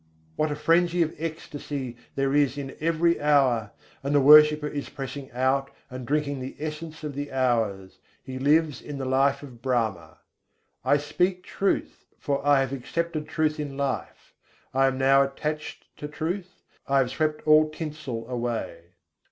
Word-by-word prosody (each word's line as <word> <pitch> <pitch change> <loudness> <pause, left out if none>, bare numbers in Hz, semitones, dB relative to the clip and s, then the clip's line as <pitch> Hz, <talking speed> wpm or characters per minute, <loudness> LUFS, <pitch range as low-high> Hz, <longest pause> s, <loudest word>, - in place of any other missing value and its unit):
What 155 - 0
a - - -1
frenzy 170 +3 +3
of 160 - -3
ecstasy 145 -5 -5 0.2
there 135 0 0
is 145 -2 +2
in 140 -1 -6
every 165 +1 +1
hour! 135 -7 +3 0.3
and 140 +1 -1
the - - +6
worshipper 150 +1 +7
is 145 -1 -5
pressing 135 0 -7
out 130 +2 +1 0.2
and 125 -1 -7
drinking 145 -1 0
the 130 +1 -6
essence 155 +1 -6
of 150 -1 -4
the 145 +1 -5
hours: 115 -8 0 0.2
he 130 0 -6
lives 150 +2 +2
in 145 -1 -7
the 135 - -4
life 135 +2 +2
of 125 -4 -12
Brahma. 110 -11 -1 0.7
I 145 - +4
speak 180 +5 -1
truth, 195 +1 -2
for 140 -1 -2
I 145 -1 +4
have 135 0 -2
accepted 155 +4 -3
truth 155 0 0
in 145 -2 -5
life; 140 -2 -4 0.4
I 135 +1 +4
am 130 -1 -1
now 135 +1 +5
attached 150 +2 -3
to 150 - -6
truth, 175 +5 -5 0.2
I 140 - +2
have 130 -2 +2
swept 155 +2 -1
all 155 0 +6
tinsel 150 -7 -6
away. 120 -9 -4
140 Hz, 160 wpm, -26 LUFS, 130-155 Hz, 0.7 s, worshipper